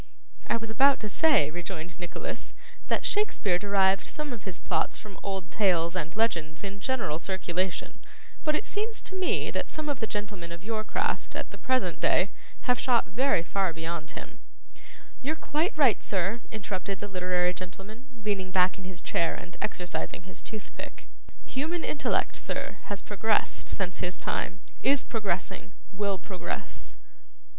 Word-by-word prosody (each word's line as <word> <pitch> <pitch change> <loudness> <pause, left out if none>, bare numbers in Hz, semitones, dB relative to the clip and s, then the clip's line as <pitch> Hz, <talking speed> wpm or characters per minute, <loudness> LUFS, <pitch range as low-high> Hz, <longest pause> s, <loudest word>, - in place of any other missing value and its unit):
'I - - +3
was 225 -1 -4
about 275 +5 +6
to 215 - -1
say,' 275 - +5
rejoined 175 0 -4
Nicholas, 175 -1 -4 0.3
'that - - +1
Shakespeare 210 - +2
derived 195 -1 +4
some 300 -3 -3
of 210 -4 -8
his 190 -2 -4
plots - - 0
from 210 -3 -10
old 190 -2 -3
tales 175 -4 +3
and 170 0 -1
legends 170 -8 +1
in 200 0 -3
general 215 - 0
circulation; 185 0 -1 0.4
but 305 -1 +3
it 415 - 0
seems 440 +2 -2
to 380 - -6
me, 375 -1 +2
that - - -1
some 310 -1 -3
of 280 -4 0
the 225 - 0
gentlemen 205 -5 -3
of 170 +2 -7
your 220 0 -1
craft, - - -1
at - - -3
the - - -8
present 260 -2 +2
day, - - +4 0.3
have 250 -2 +2
shot 245 -3 +4
very 240 -3 +3
far 190 0 +1
beyond 160 -1 -4
him - - -8 0.4
' - - -19
'You're 290 +5 0
quite 315 +4 0
right, 265 -8 +6
sir,' 195 +4 0
interrupted 200 -2 -3
the 205 - -3
literary 180 -2 +2
gentleman, 195 +7 -8 0.2
leaning 200 -3 0
back 185 +1 +4
in 190 - -8
his 185 -1 -6
chair 170 - +1
and 180 - -8
exercising 180 -3 -2
his 185 - -6
toothpick. 215 -2 -7 0.4
'Human 320 +6 -1
intellect, 295 - +1
sir, - - -3
has 205 -1 -3
progressed 210 +1 +1
since 185 -2 -1
his 180 +1 0
time, 190 +1 -1 0.2
is 280 -1 +5
progressing, 190 -3 -2 0.2
will 200 0 +1
progress. 185 0 -5
195 Hz, 165 wpm, -29 LUFS, 180-235 Hz, 0.4 s, about